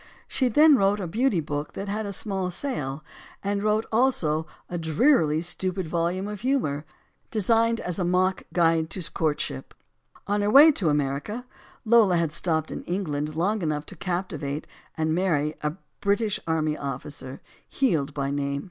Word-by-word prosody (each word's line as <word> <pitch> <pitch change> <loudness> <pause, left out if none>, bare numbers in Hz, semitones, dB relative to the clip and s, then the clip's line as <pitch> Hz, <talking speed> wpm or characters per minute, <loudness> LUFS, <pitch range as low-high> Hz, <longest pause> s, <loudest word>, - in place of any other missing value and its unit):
She 260 - +1
then 295 +4 +6
wrote 200 0 +2
a 190 - -3
beauty 210 +1 +1
book 145 0 -4
that 195 - -5
had 210 +1 -2
a - - -4
small 190 -2 -2
sale, 155 - -3 0.4
and 200 0 -1
wrote 215 +1 +1
also 170 -10 +2 0.2
a 175 - -6
drearily 160 - +3
stupid 185 +1 -2
volume 175 +4 -1
of 210 -1 -6
humor, 225 - 0 0.4
designed 230 +2 +2
as 180 +1 -2
a - - +1
mock 180 +1 +1
"Guide 165 -1 +2
to 180 -3 -2
Courtship." 150 - -2 0.5
On 205 +1 0
her 205 - +1
way 290 +7 +9
to 190 - 0
America, 145 - -1 0.4
Lola 220 -5 +5
had 165 -2 0
stopped 160 -1 -1
in - - -5
Eng 185 +3 -1
land 150 -1 -3
long 200 +6 0
enough 155 -2 -2
to - - -11
captivate 175 -6 -3 0.3
and 160 0 +1
marry 160 -4 +1
a 150 0 -1 0.3
British 210 +1 +1
army 155 -2 0
officer, 135 -1 -6 0.3
Heald 155 - 0
by 140 -1 -1
name. 140 0 -1
180 Hz, 165 wpm, -25 LUFS, 155-210 Hz, 0.5 s, way